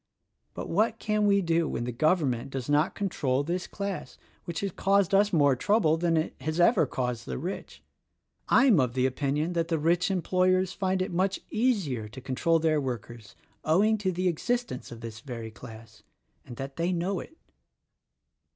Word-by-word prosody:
But -, -, -5 dB
what 220 Hz, +5 st, +1 dB
can 210 Hz, -1 st, +1 dB
we 200 Hz, -1 st, +3 dB
do 165 Hz, -1 st, +1 dB
when 120 Hz, -, -3 dB
the 125 Hz, -, -3 dB
Govern 155 Hz, +3 st, +2 dB
ment 120 Hz, +2 st, -5 dB
does 135 Hz, -2 st, -5 dB
not 145 Hz, +2 st, +2 dB
control 145 Hz, -9 st, 0 dB
this 175 Hz, +4 st, -3 dB
class 200 Hz, -2 st, -5 dB, 0.3 s
which 170 Hz, -1 st, -4 dB
has 200 Hz, -1 st, -2 dB
caused 195 Hz, +1 st, +2 dB
us 205 Hz, +1 st, +4 dB
more 145 Hz, -5 st, +4 dB
trouble 180 Hz, -, +2 dB
than 165 Hz, 0 st, +1 dB
it 160 Hz, -, -1 dB
has 155 Hz, +5 st, -2 dB
ever 200 Hz, +8 st, +4 dB
caused 125 Hz, -3 st, -3 dB
the 65 Hz, -, -3 dB
rich. 70 Hz, -, -6 dB, 0.7 s
I'm 230 Hz, -, +5 dB
of 125 Hz, -2 st, 0 dB
the 130 Hz, 0 st, +2 dB
opinion 145 Hz, +5 st, -1 dB
that 165 Hz, -1 st, 0 dB
the 165 Hz, -1 st, 0 dB
rich 170 Hz, +4 st, +2 dB
employers 185 Hz, 0 st, +1 dB
find 190 Hz, -1 st, 0 dB
it 190 Hz, -, -5 dB
much 190 Hz, +2 st, 0 dB
easier 195 Hz, -, 0 dB
to 110 Hz, -, -10 dB
control 135 Hz, +6 st, +1 dB
their 155 Hz, -2 st, +1 dB
workers 120 Hz, -4 st, -6 dB, 0.3 s
owing 210 Hz, +7 st, +3 dB
to 190 Hz, -2 st, 0 dB
the 185 Hz, +1 st, -1 dB
existence 240 Hz, -, -2 dB
of 120 Hz, -1 st, -9 dB
this 115 Hz, -2 st, -7 dB
very 115 Hz, -2 st, -7 dB
class, 110 Hz, -1 st, -12 dB, 0.5 s
and 120 Hz, -, -8 dB
that 135 Hz, 0 st, -6 dB
they 170 Hz, +2 st, 0 dB
know 180 Hz, +2 st, -1 dB
it." 320 Hz, -, -11 dB
165 Hz, 180 wpm, -28 LUFS, 130-190 Hz, 0.7 s, I'm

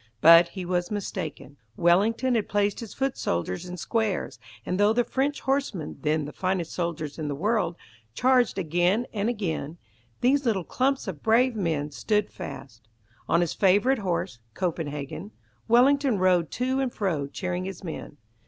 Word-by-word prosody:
But 165 Hz, +5 st, +8 dB
he 185 Hz, +1 st, -7 dB
was 175 Hz, 0 st, -1 dB
mistaken. 180 Hz, -8 st, -5 dB, 0.2 s
Wellington 210 Hz, +9 st, +3 dB
had 225 Hz, -3 st, 0 dB
placed 205 Hz, -1 st, +1 dB
his 230 Hz, -3 st, -7 dB
foot 270 Hz, -1 st, -1 dB
soldiers 90 Hz, -, -2 dB
in 180 Hz, 0 st, -6 dB
squares, 200 Hz, -, -2 dB, 0.3 s
and 180 Hz, +2 st, -2 dB
though 205 Hz, +1 st, +5 dB
the 245 Hz, +1 st, +2 dB
French 275 Hz, +4 st, -1 dB
horsemen, 265 Hz, -, -2 dB
then 155 Hz, -1 st, 0 dB
the 150 Hz, -, -8 dB
finest 185 Hz, -3 st, -1 dB
soldiers 170 Hz, -4 st, -3 dB
in 155 Hz, -, -3 dB
the 145 Hz, -, -2 dB
world, 200 Hz, +1 st, 0 dB, 0.4 s
charged 250 Hz, -3 st, +3 dB
again 175 Hz, +6 st, +1 dB
and 210 Hz, +1 st, 0 dB
again, 170 Hz, -8 st, -3 dB, 0.4 s
these 275 Hz, +3 st, +3 dB
little 215 Hz, -7 st, +1 dB
clumps 265 Hz, -, 0 dB
of 170 Hz, -7 st, -5 dB
brave 235 Hz, +3 st, +3 dB
men 160 Hz, -7 st, -1 dB
stood 210 Hz, +7 st, 0 dB
fast. 115 Hz, -4 st, -9 dB, 0.4 s
On 170 Hz, -, +4 dB
his 175 Hz, -, 0 dB
favourite 205 Hz, +7 st, +3 dB
horse 170 Hz, -, -2 dB, 0.2 s
"Copenhagen", 165 Hz, +1 st, -4 dB, 0.3 s
Wellington 260 Hz, +1 st, +4 dB
rode 180 Hz, -3 st, +3 dB
to 260 Hz, +2 st, -1 dB
and 265 Hz, -2 st, 0 dB
fro 165 Hz, -11 st, -1 dB
cheering 180 Hz, +4 st, -3 dB
his 190 Hz, -1 st, -7 dB
men. 160 Hz, -3 st, -7 dB
190 Hz, 160 wpm, -26 LUFS, 165-230 Hz, 0.4 s, But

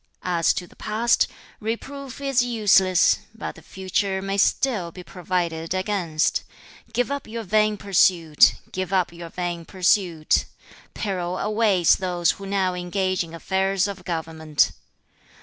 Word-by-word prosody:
As 170 Hz, -2 st, +2 dB
to 180 Hz, -, -3 dB
the -, -, -20 dB
past, 225 Hz, +2 st, +1 dB, 0.3 s
reproof 260 Hz, +5 st, -5 dB
is 275 Hz, -3 st, +2 dB
useless; 205 Hz, -6 st, +4 dB, 0.2 s
but 225 Hz, -, -5 dB
the -, -, -15 dB
future 190 Hz, +1 st, -2 dB
may 195 Hz, +1 st, -3 dB
still 200 Hz, -3 st, +1 dB
be 180 Hz, +1 st, -10 dB
provided 175 Hz, -2 st, -3 dB
against. 185 Hz, -5 st, 0 dB, 0.5 s
Give 245 Hz, +3 st, 0 dB
up 280 Hz, -1 st, -4 dB
your 225 Hz, +1 st, -5 dB
vain 215 Hz, +1 st, +2 dB
pursuit. 175 Hz, -5 st, +4 dB, 0.2 s
Give 185 Hz, -1 st, -3 dB
up 180 Hz, -3 st, +1 dB
your 170 Hz, 0 st, -9 dB
vain 175 Hz, -1 st, -4 dB
pursuit. 180 Hz, -3 st, +1 dB, 0.5 s
Peril 185 Hz, -3 st, -2 dB
awaits 210 Hz, -6 st, +3 dB
those 175 Hz, -2 st, +1 dB
who 195 Hz, -, -9 dB
now 190 Hz, -2 st, 0 dB
engage 185 Hz, +1 st, -1 dB
in 165 Hz, 0 st, -10 dB
affairs 190 Hz, +3 st, 0 dB
of 195 Hz, -2 st, -7 dB
government.' 160 Hz, -3 st, 0 dB
185 Hz, 135 wpm, -23 LUFS, 175-210 Hz, 0.5 s, useless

